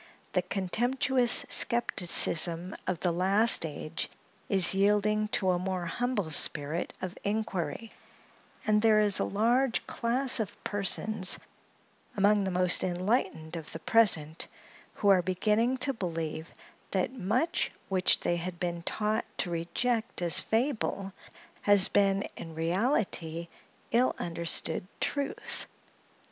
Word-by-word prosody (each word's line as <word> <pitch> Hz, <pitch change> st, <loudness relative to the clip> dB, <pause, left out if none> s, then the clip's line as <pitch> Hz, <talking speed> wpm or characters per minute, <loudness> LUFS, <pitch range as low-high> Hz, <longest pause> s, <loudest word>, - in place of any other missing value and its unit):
The 180 Hz, -, +2 dB
contemptuous 240 Hz, +7 st, +1 dB
skepticism 175 Hz, -5 st, +3 dB
of 185 Hz, -3 st, -3 dB
the 175 Hz, -, +1 dB
last 190 Hz, +2 st, +5 dB
age 155 Hz, +2 st, -6 dB, 0.4 s
is 190 Hz, -3 st, +6 dB
yielding 210 Hz, +2 st, +1 dB
to 190 Hz, -3 st, 0 dB
a 175 Hz, -, -1 dB
more 185 Hz, -1 st, -3 dB
humble 205 Hz, -1 st, -3 dB
spirit 150 Hz, +2 st, -1 dB
of 185 Hz, +1 st, -5 dB
inquiry; 210 Hz, -1 st, -3 dB, 0.7 s
and 210 Hz, 0 st, +2 dB
there 220 Hz, -1 st, +4 dB
is 205 Hz, -2 st, +4 dB
a -, -, +1 dB
large 235 Hz, +5 st, 0 dB
class 250 Hz, +2 st, +2 dB
of 215 Hz, -4 st, -4 dB
persons 205 Hz, -1 st, +1 dB, 0.8 s
among 205 Hz, 0 st, +2 dB
the -, -, -1 dB
most 180 Hz, 0 st, +2 dB
enlightened 180 Hz, -3 st, -2 dB
of 160 Hz, -2 st, -8 dB
the -, -, -5 dB
present, 165 Hz, -7 st, +2 dB, 0.5 s
who 205 Hz, -, 0 dB
are 190 Hz, -2 st, +5 dB
beginning 210 Hz, +7 st, 0 dB
to 275 Hz, +2 st, -1 dB
believe 165 Hz, -5 st, -5 dB, 0.4 s
that 190 Hz, +6 st, -2 dB
much 245 Hz, -, -1 dB, 0.2 s
which 190 Hz, -1 st, +1 dB
they 175 Hz, -, -1 dB
had 175 Hz, 0 st, -6 dB
been 175 Hz, -1 st, -3 dB
taught 215 Hz, +5 st, -2 dB
to 175 Hz, -, -2 dB
reject 220 Hz, +8 st, -2 dB
as 170 Hz, -, +4 dB
fable, 220 Hz, -5 st, -2 dB, 0.5 s
has 205 Hz, -2 st, +3 dB
been, 195 Hz, -1 st, +1 dB
in 165 Hz, -1 st, -10 dB
reality, 170 Hz, -, -1 dB, 0.4 s
ill 245 Hz, +2 st, +2 dB
understood 170 Hz, +1 st, -1 dB
truth. 280 Hz, -1 st, -4 dB
195 Hz, 125 wpm, -28 LUFS, 175-220 Hz, 0.8 s, is